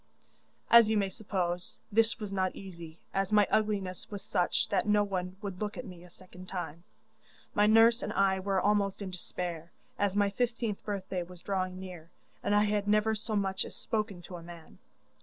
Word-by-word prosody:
'As 235 -2 +9
you 220 - +3
may 200 -1 +1
suppose, 180 -3 -3
this 225 +2 +3
was 205 -2 -5
not 185 -1 0
easy, 170 -4 -9 0.2
as 195 +1 0
my 210 -1 +6
ugliness 200 -4 0
was 205 -2 -6
such 180 +3 +1
that 200 -1 +1
no 210 0 +4
one 185 -2 -3
would 195 -2 -5
look 210 0 -3
at 255 - -5
me 180 -4 -10
a 180 - -14
second 185 +1 -13
time. 175 -3 -5 0.7
My 205 0 +4
nurse 225 +2 +6
and - - -3
I 195 -1 +3
were 195 0 +1
almost 200 0 +1
in 190 - -5
despair, 175 -2 -5 0.3
as 200 -1 +1
my 205 -1 +3
fifteenth 230 -2 -1
birthday 195 -3 -3
was 175 0 -10
drawing 185 -2 -2
near, 180 -3 -9 0.3
and 205 - +1
I 210 - +5
had 205 -1 0
never 215 +1 +3
so 215 +1 -3
much 195 -1 +1
as - - -9
spoken 210 -5 -3
to 180 0 -8
a - - -10
man. 170 -1 -12
195 Hz, 195 wpm, -31 LUFS, 180-210 Hz, 0.7 s, As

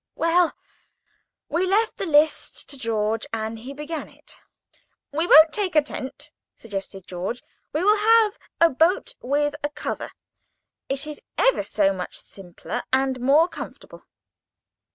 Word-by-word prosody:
Well, 335 +1 +2 0.9
we 360 +3 0
left 430 +4 +1
the 390 - -3
list 305 0 +2
to - - -3
George, 220 -1 -1
and 220 0 -3
he 250 +5 -8
began 300 +3 -6
it. - - -13
[Picture: - - -31 0.3
Tent] - - -40
"We 320 +4 0
won't 315 0 +8
take 390 -5 -1
a 305 - +7
tent," 265 -2 -7 0.2
suggested 195 -3 -7
George; 190 +7 -5 0.3
"we 310 +4 -1
will 420 +2 +5
have 440 0 +4 0.2
a 335 0 +6
boat 345 - +2
with 290 +3 0
a 290 - 0
cover. 295 - -5 0.8
It 275 +2 -1
is 300 -1 -8 0.2
ever - - +3
so 195 -2 +1
much 180 -1 -5
simpler, 195 +5 -7
and 265 -1 +1
more 290 +6 +5
comfortable." - - -10
290 Hz, 150 wpm, -24 LUFS, 230-335 Hz, 0.9 s, won't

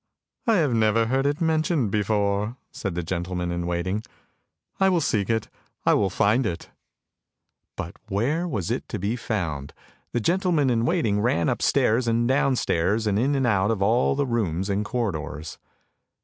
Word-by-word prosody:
" - - -65
" - - -41
I 225 - +5
have 150 -9 +2
never 110 0 +3
heard 135 +4 +1
it 145 +2 -1
mentioned 160 - +1
before," 105 +2 0
said 95 -5 -4
the 85 - -2
gentleman 90 +1 -3
in 85 0 -2
waiting. 90 +4 -1 0.4
" - - -47
I 190 - +5
will 180 -2 +3
seek 105 - 0
it, 110 -2 +1
and - - -29 0.3
I - - +5
will 100 -2 +2
find 105 +7 +2
it! 85 - -5 0.5
" - - -57
But - - -6
where 140 - 0
was 105 - -2
it - - -3
to - - -3
be 100 +5 -1
found? 80 - -3 0.4
The 120 - 0
gentleman 170 - +2
in 115 -1 +1
waiting 115 - +1
ran 85 -8 +1
upstairs 120 +3 +2
and 115 +1 +2
downstairs 115 - +1
and 105 -1 +1
in 140 +4 +2
and 135 -1 +1
out 100 -3 +2
of 105 -4 0
all 115 +6 +3
the 140 0 +1
rooms 100 -6 -1
and 100 +2 0
corridors. 80 - -4
110 Hz, 185 wpm, -25 LUFS, 95-130 Hz, 0.5 s, I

